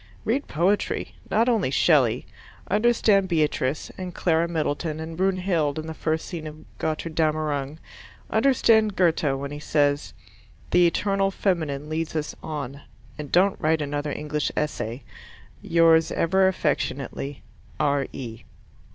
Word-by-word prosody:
Read 265 +6 0
poetry 185 +6 0 0.2
not 225 +3 +2
only 225 - +2
Shelley. 130 -5 +3 0.5
Understand 210 -2 +3
Beatrice, 150 -4 0
and 180 -2 -6
Clara 165 -1 +2
Middleton, 155 -1 -2
and 160 +1 -6
Brunhilde 180 -5 0
in 155 - -4
the 160 - -5
first 160 0 -2
scene 160 -3 -6
of 155 +1 -11
Gotterdammerung. 155 -2 -1 0.5
Understand 220 -3 +3
Goethe 160 -6 +2
when 140 0 -5
he 145 - -6
says 145 -1 0 0.6
"the 175 -1 +5
eternal 195 +3 +1
feminine 160 -8 -1
leads 160 +1 -3
us 150 -1 -3
on," 140 -3 -5 0.4
and 150 -2 -6
don't 190 +2 +3
write 160 -1 +2
another 145 +1 -3
English 150 0 -2
Essay. 130 -4 -2 0.6
Yours 165 -1 +4
ever 190 +3 +3
affectionately, 145 -5 -2 0.4
R.E. 135 -5 -2
160 Hz, 125 wpm, -25 LUFS, 145-185 Hz, 0.6 s, the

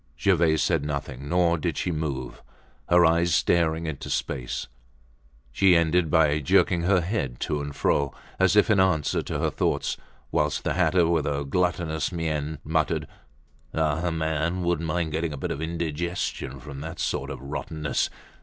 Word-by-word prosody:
Gervaise 85 -5 +3
said 80 -5 +1
nothing, 70 -2 -4
nor 85 -1 +2
did - - -2
she 90 - -1
move; 70 -6 -4 0.5
her 90 0 +6
eyes 85 0 +3
staring 80 -1 +2
into 80 -4 -5
space. 60 -2 -2 0.9
She 95 +7 +4
ended 85 0 +3
by 75 -1 +3
jerking 85 +4 +3
her 90 +1 +3
head 85 - -2
to 75 - -1
and 70 0 -6
fro, 70 -1 +1 0.3
as 95 +1 +4
if 105 +1 +5
in 100 - +4
answer 90 -6 +2
to - - -4
her - - 0
thoughts, - - -1 0.3
whilst - - 0
the - - 0
hatter, 90 -2 +3
with 80 -4 +1
a 70 0 -1
gluttonous 80 -1 0
mien, 80 -3 -2
muttered: 80 0 0 0.7
"Ah, 80 -1 +1
a 90 - 0
man 80 +2 -1
wouldn't 85 -2 0
mind 80 0 -1
getting 80 0 -2
a - - -5
bit - - -3
of 70 - -4
indigestion 80 -4 -3
from 70 0 -8
that 80 +2 -7
sort - - -2
of - - -6
rottenness. 75 +2 -2
80 Hz, 165 wpm, -26 LUFS, 75-85 Hz, 0.9 s, her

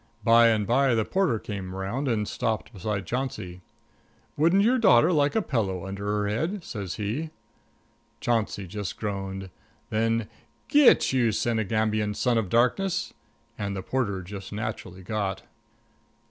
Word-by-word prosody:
By 115 +1 +6
and 110 -2 +2
by 130 +2 +3
the 110 -1 +1
porter 185 -12 +1
came 95 -3 -6
around 105 +9 -3
and 110 -4 0
stopped 110 +1 -2
beside 100 0 -3
Chauncey. 105 -7 -4 0.7
"Wouldn't 170 +6 +4
your 250 +4 +3
daughter 165 - +5
like 145 +2 +2
a 220 - +2
pillow 95 - -1
under 100 +1 -6
her 105 0 0
head?" 160 - -2
says 100 - -5
he. 115 +10 -3 0.9
Chauncey 110 -4 -1
just 100 +1 -5
groaned. 95 -2 -4 0.4
Then 115 0 +1 0.4
"Git; 290 - +5
you 120 -4 +3
Senegambian 110 -1 0
son 120 0 +2
of 100 -5 -3
darkness!" 185 - +1 0.5
And 100 -1 -2
the 95 - -5
porter 100 -8 -1
just 95 +2 -8
naturally 105 -4 -5
got. 95 -1 -3
110 Hz, 140 wpm, -26 LUFS, 100-125 Hz, 0.9 s, By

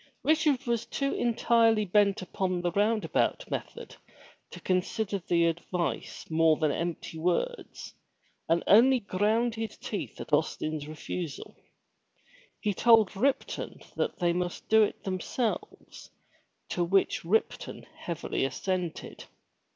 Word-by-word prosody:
Richard 300 -2 +2
was 235 -1 -1
too 275 0 -1
entirely 230 -2 +3
bent 200 0 +2
upon 185 -1 -2
the 175 0 0
roundabout 215 - +1
method - - -6 0.5
to - - -10
consider 195 +3 -1
the 170 -1 +2
advice 170 +1 -2
more 160 -1 +3
than 155 -2 +1
empty 165 0 -4
words, 180 - -2 0.6
and 165 +1 +2
only 250 +5 +6
ground 215 +4 +1
his 225 0 -5
teeth - - -5
at - - -8
Austin's 155 -2 0
refusal. 155 0 -6 1.0
He 210 - 0
told 220 -1 +5
Ripton 265 +7 -1
that - - -1
they 175 -2 +1
must 180 0 -3
do 220 0 +6
it 210 - 0
themselves 200 +5 -4 0.6
to 175 - 0
which 190 +3 +1
Ripton 210 +7 -1
heavily 170 -5 -3
assented. 175 +6 -3
195 Hz, 120 wpm, -29 LUFS, 170-225 Hz, 1.0 s, only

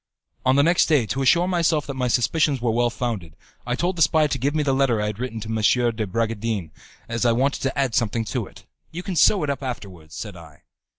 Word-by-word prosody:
On 130 - +4
the 140 - +5
next 170 +3 +3
day, 145 -7 +3
to 135 +5 -3
assure 170 +7 +4
myself 170 -4 +1
that 140 - -5
my 130 -1 -1
suspicions 140 +4 +1
were 120 -1 0
well 120 +1 +2
founded, 110 -10 -4 0.3
I 125 - 0
told 175 +7 -1
the - - -2
spy 155 0 +4
to 150 - -1
give 140 +5 0
me 155 - +1
the 135 -2 +1
letter 130 -4 +2
I 105 - 0
had 105 0 -4
written 125 -3 -4
to 110 - -7
M. 110 +2 +2
de 110 -2 -2
Bragadin 110 -4 -2 0.4
as 115 +1 -2
I 120 -1 +4
wanted 135 +4 0
to 135 0 -2
add 135 -4 0
something 115 -1 0
to - - -3
it. - - -16 0.2
"You 175 +3 -7
can 185 - -4
sew 190 +1 +4
it 145 - 0
up 140 - -5
afterwards," 95 - -7
said 105 -4 -6
I. 80 -3 -15
125 Hz, 245 wpm, -23 LUFS, 110-145 Hz, 0.4 s, the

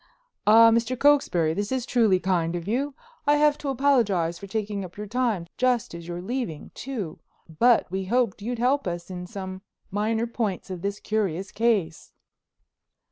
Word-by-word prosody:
"Ah, 225 +2 +8
Mr. 235 +2 +1
Cokesbury, 240 - +3
this 205 +5 -3
is 260 -2 -1
truly 220 -8 +3
kind 175 -3 0
of 175 +1 -5
you. 270 +6 -1 0.3
I 290 - +6
have 295 0 +4
to 285 - -3
apologize 225 -11 +2
for 200 - -9
taking 205 -1 -3
up 180 0 -10
your 210 - -5
time, 225 -5 -1
just 245 -3 +1
as 170 0 -8
you're 175 0 -5
leaving, 230 - -4
too, 220 -12 -5 0.4
but 240 -1 +5
we 190 0 -2
hoped 230 -1 0
you 235 +4 -3
might - - -4
help 255 +1 +1
us 175 +1 -4
in 180 -1 -6
some 190 -2 -7 0.3
minor 220 +3 0
points 220 -6 -3
of 180 -2 -5
this 200 +1 -3
curious 195 -4 -2
case." 205 -8 0
210 Hz, 175 wpm, -25 LUFS, 185-245 Hz, 0.4 s, Ah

